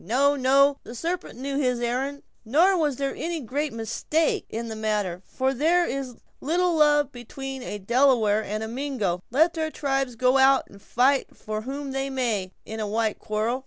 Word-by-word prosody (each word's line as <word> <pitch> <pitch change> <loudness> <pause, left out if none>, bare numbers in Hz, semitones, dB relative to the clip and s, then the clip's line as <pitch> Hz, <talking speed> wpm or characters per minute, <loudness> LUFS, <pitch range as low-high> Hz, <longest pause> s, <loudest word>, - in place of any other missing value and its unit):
"No, 275 +8 +2
no, 275 +1 +4
the 235 - -10
sarpent 335 -1 -4
knew 275 +2 -2
his 250 -3 +1
errand; 260 +4 -2 0.2
nor 325 - +4
was 300 -6 +1
there 275 +1 -2
any 335 0 -3
great 285 +3 -2
mistake 230 +8 -1
in 230 +1 -4
the 220 - -5
matter, 210 -5 -1
for 265 0 0
there 335 +6 +3
is 270 -3 -4
but - - -24 0.2
little 350 +4 +1
love 295 -2 +4
atween 265 +2 -7
a 210 - -5
Delaware 220 -1 +3
and 215 +2 -3
a - - -4
Mingo, 230 -8 -2
let 320 +7 +3
their 315 -1 -2
tribes 270 -4 -1
go 255 +3 +3
out 270 0 +5
to 200 - -14
fight 260 +6 +1
for 215 0 -4
whom 275 +3 -5
they 270 +1 -2
may, 230 -8 -1
in 220 +1 -6
a 215 - -2
white 220 0 -1
quarrel. 220 +3 -1
265 Hz, 190 wpm, -25 LUFS, 225-285 Hz, 0.2 s, out